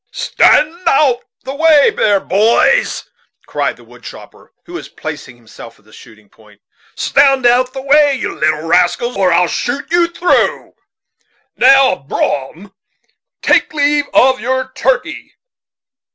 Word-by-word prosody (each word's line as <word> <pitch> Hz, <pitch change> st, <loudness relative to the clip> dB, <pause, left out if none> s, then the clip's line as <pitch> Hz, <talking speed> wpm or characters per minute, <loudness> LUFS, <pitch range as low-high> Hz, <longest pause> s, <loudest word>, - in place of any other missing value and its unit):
"Stand 325 Hz, +4 st, +1 dB
out 270 Hz, -5 st, +2 dB
of -, -, -29 dB, 0.2 s
the 270 Hz, -, -7 dB
way 310 Hz, -1 st, +3 dB
there, 205 Hz, -2 st, 0 dB
boys!" 225 Hz, -, 0 dB, 0.4 s
cried -, -, -3 dB
the -, -, -18 dB
wood -, -, -19 dB
chopper, -, -, -14 dB
who 350 Hz, -, -14 dB
was 355 Hz, -, -8 dB
placing 145 Hz, -5 st, -9 dB
himself 115 Hz, 0 st, -15 dB
at 105 Hz, -, -30 dB
the 110 Hz, -, -22 dB
shooting 110 Hz, -1 st, -17 dB
point 105 Hz, 0 st, -23 dB, 0.4 s
stand 275 Hz, -2 st, +1 dB
out 245 Hz, +1 st, +3 dB
of 255 Hz, -, -29 dB
the 265 Hz, -1 st, -8 dB
way, 290 Hz, 0 st, +3 dB
you 255 Hz, -, -5 dB
little 155 Hz, +1 st, -2 dB
rascals, 180 Hz, +8 st, 0 dB
or 190 Hz, -2 st, +1 dB
I 170 Hz, +1 st, +3 dB
will 180 Hz, -, +1 dB
shoot 245 Hz, -, -4 dB, 0.3 s
through 355 Hz, -, -1 dB
you. -, -, 0 dB, 0.8 s
Now, 270 Hz, -3 st, +4 dB
Brom, 145 Hz, +7 st, -5 dB, 0.7 s
take -, -, +1 dB
leave 290 Hz, 0 st, +1 dB
of 260 Hz, 0 st, +2 dB
your 260 Hz, +3 st, -3 dB
turkey. -, -, -3 dB
250 Hz, 150 wpm, -14 LUFS, 170-285 Hz, 0.8 s, Now